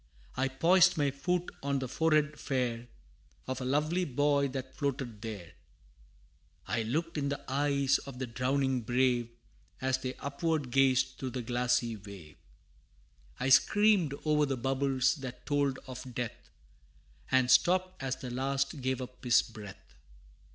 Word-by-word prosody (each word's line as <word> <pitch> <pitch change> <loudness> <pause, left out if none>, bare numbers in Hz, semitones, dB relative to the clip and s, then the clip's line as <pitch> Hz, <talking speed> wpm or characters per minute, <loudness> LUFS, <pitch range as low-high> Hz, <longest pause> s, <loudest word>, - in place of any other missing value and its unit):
I 130 +1 +1
poised 175 +7 +4
my 145 -2 +2
foot 180 +6 -2
on 140 0 0
the 130 -1 -3
forehead 150 +1 +1
fair 120 -3 -2 0.6
Of 130 0 -4
a - - -3
lovely 150 +7 +1
boy 145 -1 +2
that 130 -1 -6
floated 130 -6 -3
there; 105 -7 -7 1.1
I 115 - -1
looked 155 +8 -2
in 140 -1 -1
the 140 -1 -2
eyes 140 0 +2
of 135 -2 -10
the 130 - -3
drowning 130 +2 0
brave, 120 0 +1 0.5
As 130 0 0
they 130 -1 -4
upward 140 -1 -2
gazed 130 0 +2
through 130 - -3
the 125 0 -4
glassy 120 -1 0
wave; 95 -7 -12 1.0
I 130 - 0
screamed 195 0 +4
o'er 150 -1 +3
the 135 -1 -1
bubbles 135 +2 +1
that 130 -3 -8
told 145 -2 +1
of 130 -1 -9
death, 120 -3 -5 0.8
And 130 -1 +3
stooped 185 0 +3
as 135 -1 -1
the 130 -1 -7
last 135 +3 -1
gave 130 0 -1
up 125 0 -12
his 120 -1 +5
breath. 110 -5 -12
130 Hz, 145 wpm, -31 LUFS, 125-145 Hz, 1.1 s, his